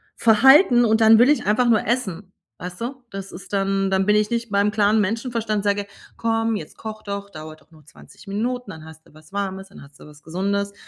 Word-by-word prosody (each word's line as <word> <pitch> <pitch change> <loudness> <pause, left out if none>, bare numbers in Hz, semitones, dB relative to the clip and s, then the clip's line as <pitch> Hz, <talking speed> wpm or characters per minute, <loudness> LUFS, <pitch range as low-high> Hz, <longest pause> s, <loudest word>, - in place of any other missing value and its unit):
Verhalten. 245 - +5
Und 220 0 +2
dann 220 0 +7
will 240 +4 +5
ich 295 - +1
einfach 225 +4 +2
nur 230 -2 +2
essen, 205 -6 -3 0.3
weißt 180 +2 -8
du? 255 +2 -6
Das 195 -1 -8
ist 190 - -12
dann 195 0 0
dann 190 0 +1
bin 210 +1 +3
ich 210 0 +1
nicht 235 -2 -3
beim 200 +1 +2
klaren 210 +1 +2
Menschenverstand 225 0 -2
sage: 205 0 -1 0.3
„Komm, 225 0 -1
jetzt 205 - -8
koch 215 -1 -8
doch. 200 0 -6
Dauert 155 -1 -10
doch - - -29
nur 155 -3 -20
20 - - -17
Minuten. 240 +4 -3
Dann 160 -4 -10
hast 160 0 -15
du - - -23
was 155 +3 -19
Warmes. 195 -1 -4
Dann 195 - -14
hast 140 0 -17
du - - -14
was 150 -1 -16
Gesundes.“ 200 +5 -3
205 Hz, 220 wpm, -21 LUFS, 190-225 Hz, 0.3 s, dann